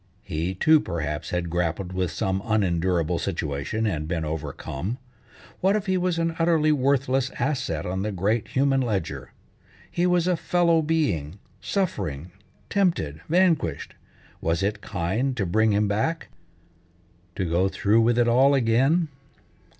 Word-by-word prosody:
He, 90 0 -3
too, 155 - +5
perhaps 80 - -4
had 90 -1 -2
grappled 90 +2 -2
with 90 -1 -1
some 95 0 -1
unendurable 90 -5 +1
situation 70 +11 -2
and 75 -7 -2
been 80 -2 -2
overcome. 75 - -4 0.6
What 195 +2 +3
if 210 -1 -1
he 190 -2 +1
was 180 -2 0
an 165 0 0
utterly 165 -2 +3
worthless 135 -2 +1
asset 125 - -1
on 95 +1 -2
the 105 +2 -2
great 105 +4 0
human 135 0 +2
ledger? 80 - -3 0.6
He 175 +1 +1
was 180 -1 +2
a 180 -1 +2
fellow 170 0 +2
being, 105 - -1 0.2
suffering, 95 - -2 0.4
tempted, 165 - 0
vanquished. 165 - +1 0.5
Was 80 +3 0
it 105 +1 -1
kind 110 +9 -2
to 100 - 0
bring 110 +5 +2
him 105 +1 +2
back, 110 +12 -1 1.1
to 95 - -1
go 90 +3 +1
through 110 +2 +2
with 120 +1 +2
it 120 -1 +3
all 130 +4 +5
again? 135 +7 +2
105 Hz, 140 wpm, -25 LUFS, -, 1.1 s, too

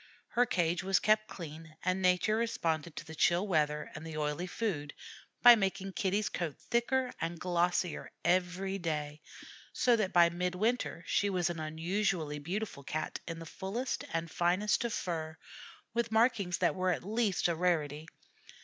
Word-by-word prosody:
Her 245 +1 +2
cage 175 -3 +1
was 190 -1 +3
kept 215 0 +3
clean, 160 -4 -9
and 185 +1 +1
nature 185 +4 +3
responded 170 -9 -1
to - - -6
the 160 - -9
chill 175 +4 +3
weather 150 -4 0
and 150 - -8
the 160 -1 -6
oily 150 +4 -1
food 175 -9 -3 0.5
by 245 0 +12
making 195 -2 -2
Kitty's 200 +3 0
coat 165 -5 -4
thicker 250 +2 0
and 165 0 -3
glossier 175 -1 0
every 185 +2 +1
day, 150 -3 -3 0.5
so 245 -2 +3
that 210 -4 0
by 170 -1 +6
midwinter 180 +2 -1
she 205 - +1
was 180 -3 +1
an 170 - -6
unusually 160 0 -1
beautiful 180 -1 -4
Cat 155 +3 -3
in 165 -1 -4
the 165 - -8
fullest 205 +10 -3
and 165 0 -2
finest 185 +6 +2
of 235 - -1
fur, 160 -5 -3 0.6
with 235 -1 0
markings 220 -6 +2
that 170 -4 +2
were 185 +2 0
at 180 - 0
least 215 -1 +1
a 170 - +1
rarity. 160 -3 0
180 Hz, 160 wpm, -32 LUFS, 160-205 Hz, 0.6 s, by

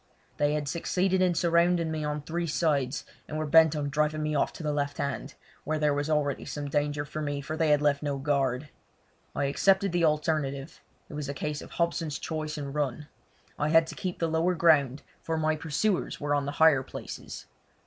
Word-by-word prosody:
They 145 0 +2
had 150 -1 -2
succeeded 185 +4 0
in 180 -2 +3
surrounding 170 0 +2
me 155 -1 -2
on 150 0 -3
three 170 +2 -2
sides, 150 -4 0 0.2
and 155 - -4
were 155 - -1
bent 160 +1 +6
on 145 -1 -2
driving 150 +1 0
me 150 0 -1
off 145 - +1
to - - -8
the 150 -1 0
left 145 -1 -2
hand, 140 -2 -3 0.3
where 155 +1 -1
there 150 -1 +2
was 145 +2 -1
already 145 -3 0
some 145 -1 -5
danger 145 0 0
for 155 +1 -5
me, 145 -1 -2
for 145 +3 -5
they 160 -1 +1
had 150 0 +4
left 145 -1 +2
no 145 -2 -2
guard. 135 -1 0 0.7
I 145 - 0
accepted 190 +7 +3
the 175 -1 +1
alternative—it 150 -1 -2
was 145 -1 -4
a 140 - -4
case 150 +2 -3
of - - -11
Hobson's 170 -3 -1
choice 155 -1 -4
and 140 -2 -5
run. 150 0 -2 0.5
I 150 +1 +1
had 165 +1 +5
to - - -8
keep 180 -1 -4
the 165 - 0
lower 165 +3 +1
ground, 150 -5 +3 0.2
for 165 0 -2
my 155 0 +1
pursuers 160 +6 -1
were 145 0 -1
on 140 -1 0
the 145 - -3
higher 155 -3 +5
places. - - -8
150 Hz, 205 wpm, -28 LUFS, 145-160 Hz, 0.7 s, bent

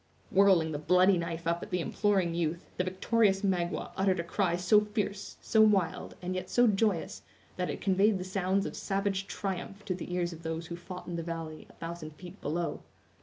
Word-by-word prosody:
Whirling 190 -5 +5
the 145 - -3
bloody 180 +5 +5
knife 170 0 -4
up 170 +1 0
at - - -7
the 180 - 0
imploring 190 -1 +1
youth, 170 0 -1
the 180 - +2
victorious 195 +2 +2
Magua 180 -2 0
uttered 190 -1 +2
a - - 0
cry 175 0 0
so 180 +4 +5
fierce, 210 -1 -3
so 220 - +4
wild, 200 -6 +2
and 180 +1 -2
yet 185 0 -4
so 245 - +4
joyous, 195 - +1 0.3
that 180 -1 -2
it - - -4
conveyed 195 +2 +3
the 180 - -4
sounds 190 +1 0
of - - -5
savage 195 0 -1
triumph 195 +1 -5
to 185 - -1
the 180 0 -6
ears 175 -1 -1
of 165 - -11
those 160 0 -4
who 170 - -6
fought 180 +1 -8
in 175 -1 -4
the - - -2
valley, 165 -2 -6
a - - -16
thousand 165 -2 -7
feet 180 +4 -11
below. 165 +3 -2
180 Hz, 205 wpm, -30 LUFS, 170-195 Hz, 0.3 s, Whirling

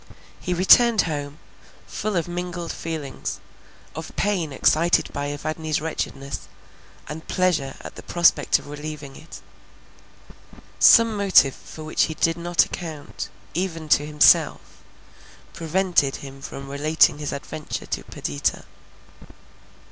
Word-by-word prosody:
He 180 - -2
returned 220 +5 +6
home, 145 -2 -4 0.5
full 215 -2 -3
of 170 -1 0
mingled 175 -1 -4
feelings, 155 -5 -5 0.6
of 160 +1 -8
pain 185 -7 0
excited 160 +5 +2
by 145 0 -3
Evadne's 155 +1 -3
wretchedness, 140 - -5 0.6
and 160 +2 -8
pleasure 165 -8 0
at - - -9
the - - -10
prospect 170 -4 +3
of - - -12
relieving 150 -1 -7
it. 165 - -12 1.4
Some 230 -1 +7
motive 190 -9 +5
for 155 - -11
which 155 - +1
he 160 - -5
did 165 +1 +1
not 175 0 +2
account, 160 -4 -7 0.2
even 165 -2 -3
to 145 - +4
himself, 150 0 +3 0.7
prevented 170 -4 +1
him 135 -1 -10
from 135 0 -8
relating 145 +2 +2
his 150 - -3
adventure 150 +2 -6
to - - -4
Perdita. 70 0 -3
155 Hz, 120 wpm, -23 LUFS, 145-175 Hz, 1.4 s, Some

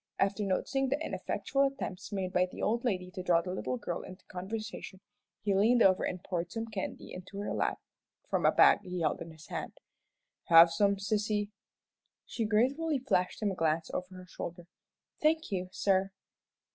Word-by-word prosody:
After 195 +1 +1
noticing 265 +8 0
the 280 +3 0
ineffectual 275 -3 -2
attempts 275 -9 -2
made 190 -2 -2
by 180 0 +3
the - - -10
old 235 +3 0
lady 185 -7 -1
to 185 - -6
draw 175 -2 +3
the 180 - -4
little 130 -8 -2
girl 170 +7 -4
into 185 0 -11
conversation, 195 +1 -6 0.4
he 205 -1 +2
leaned 230 +5 +5
over 185 -1 +4
and 180 0 -3
poured 175 -2 -3
some 225 0 -3
candy 210 -4 -6
into 185 +2 -9
her 205 - -3
lap - - 0 0.5
from - - 0
a - - +6
bag - - +6
he 180 -1 -5
held 160 - 0
in - - -6
his 160 -1 -14
hand. - - -4 0.7
"Have 165 0 +8
some, 200 +4 +3
sissy?" 205 +1 -1 0.7
She 230 - -2
gratefully 270 +9 +2
flashed 220 -7 0
him 205 - +2
a - - -4
glance 160 -1 0
over 185 +1 -4
her 185 0 -10
shoulder. 175 -1 -7 0.6
"Thank 315 -1 +2
you, 185 -1 -2
sir." 195 0 +2
195 Hz, 180 wpm, -31 LUFS, 180-220 Hz, 0.7 s, Have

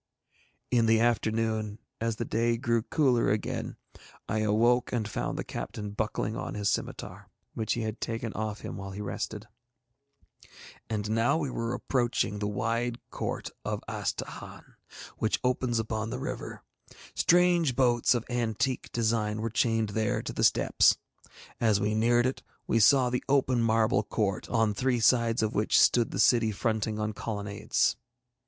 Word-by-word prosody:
In 120 -2 +3
the 110 0 +4
afternoon, 110 -2 0 0.2
as 115 0 -1
the 115 - -3
day 115 +1 +1
grew 115 -1 +1
cooler 125 -1 +2
again, 105 0 -2 0.5
I 110 - -1
awoke 115 +4 +2
and 115 -4 -1
found - - -3
the - - -2
captain 105 -1 -6
buckling 110 +1 -2
on - - -5
his 105 -1 0
scimitar, - - -4 0.2
which 110 - -1
he 120 - -2
had 110 0 -4
taken 115 -1 -3
off 110 -1 -4
him - - -6
while 95 0 -6
he 95 +1 -7
rested. 105 - -5 1.4
And 105 -1 -2
now 115 +6 +2
we 145 -5 -2
were 115 0 -2
approaching 120 -5 0
the 105 - -1
wide 115 +3 -1
court - - -4
of - - -3
Astahahn, - - -5 0.5
which 110 - +1
opens 125 -1 +1
upon 110 0 -2
the - - -4
river. - - -6 0.5
Strange 175 -5 +3
boats 120 -1 +3
of 120 - -2
antique 120 +1 -1
design 110 -2 0
were 115 0 -2
chained 115 -1 +1
there 110 +1 -1
to - - -5
the - - -2
steps. - - +4 0.6
As 110 -4 +3
we 105 +1 0
neared 120 +2 +3
it 130 - -1 0.2
we 115 - +2
saw 125 +3 +5
the 125 - -1
open 130 -3 +3
marble 110 -1 +3
court, 100 -3 -2
on 110 -3 +2
three 125 +3 0
sides 115 -1 +3
of 110 - -1
which 105 +1 +3
stood 120 -2 +4
the - - -5
city 115 -3 +4
fronting 110 0 -1
on 105 0 -2
colonnades. 100 -1 -1
115 Hz, 160 wpm, -28 LUFS, 110-120 Hz, 1.4 s, saw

